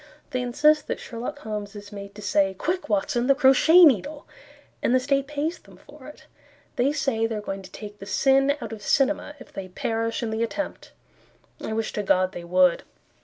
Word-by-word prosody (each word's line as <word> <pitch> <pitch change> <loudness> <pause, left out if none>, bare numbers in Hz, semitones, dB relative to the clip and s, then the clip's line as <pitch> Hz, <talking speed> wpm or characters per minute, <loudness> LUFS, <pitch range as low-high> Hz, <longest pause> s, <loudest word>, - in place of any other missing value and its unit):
They 255 - -1
insist 300 +5 +2
that - - -3
Sherlock 235 0 -6
Holmes 210 -1 -6
is 205 0 -10
made 200 -1 -9
to 210 - -10
say, 195 -1 +1
"Quick, 355 - -3
Watson, 230 +4 0
the 275 - +5
crochet 300 +6 +7
needle!" 290 - +1 0.6
And 250 - +2
the - - +5
state 275 +1 0
pays 300 +3 -3
them - - -18
for - - -15
it. - - -13 0.5
They 255 +4 +2
say 270 -6 0
they 225 - -4
are - - -3
going 195 -1 -5
to 185 -1 -13
take 210 -1 -10
the 195 - -9
sin 270 +6 +3
out 230 - -6
of 215 - -9
cinema 290 +5 +1
If 255 - -14
they 190 -1 -6
perish 225 +5 -2
in 225 - -2
the 220 +1 -2
attempt, 265 +6 -4 0.7
I 220 - -3
wish 225 0 -2
to 210 - -2
God 185 -2 +2
they 175 - -8
would! 180 0 +3
230 Hz, 205 wpm, -25 LUFS, 205-275 Hz, 0.7 s, crochet